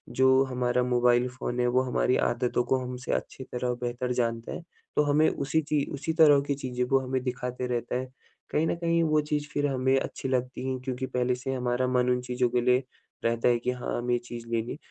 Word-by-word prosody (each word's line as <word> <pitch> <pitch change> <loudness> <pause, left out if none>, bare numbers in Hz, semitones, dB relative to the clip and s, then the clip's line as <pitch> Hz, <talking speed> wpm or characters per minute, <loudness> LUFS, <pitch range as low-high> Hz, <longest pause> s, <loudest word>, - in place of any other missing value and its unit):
जो 130 0 +5
हमारा 125 -1 0
mobile 125 0 +3
phone 125 -1 -4
है, 125 - +2
वो 125 +1 +3
हमारी 130 0 +1
आदतों 120 0 0
को 130 +2 +1
हमसे 125 0 -5
अच्छी 130 - -3
तरह 125 -1 -2
बेहतर 125 +1 -2
जानता 115 -2 -1
है - - -6 0.3
तो 150 - +4
हमें 150 +2 +3
उसी 145 +3 0
ची 150 -1 0
उसी 145 +3 -2
तरह 155 -3 +6
की 140 - +1
चीज़ें 125 -2 -3
वो 135 +2 +3
हमें 130 0 0
दिखाते 125 0 -3
रहता 120 -1 -2
है। 130 - -3 0.5
कहीं 155 - +2
न - - 0
कहीं 170 0 +1
वो 155 -1 +3
चीज़ 150 -1 -1
फिर 145 0 +1
हमें 130 -1 +2
अच्छी 135 - -5
लगती 130 0 -2
हैं 130 -1 -2
क्योंकि 130 0 -3
पहले 125 -1 0
से 130 +2 -6
ही 135 - 0
हमारा 125 0 0
मन 125 0 +2
उन 125 0 +2
चीज़ों 125 0 0
के 125 +1 +1
लिए 125 +2 +3 0.4
रहता 115 0 +1
है 120 -1 +4
कि 125 +2 -1
हाँ, 125 -1 -3
हमें 120 +1 -1
ये 120 - +2
चीज़ 120 -1 -9
लेनी 115 0 -1
है। - - -5
125 Hz, 230 wpm, -28 LUFS, 125-135 Hz, 0.5 s, तरह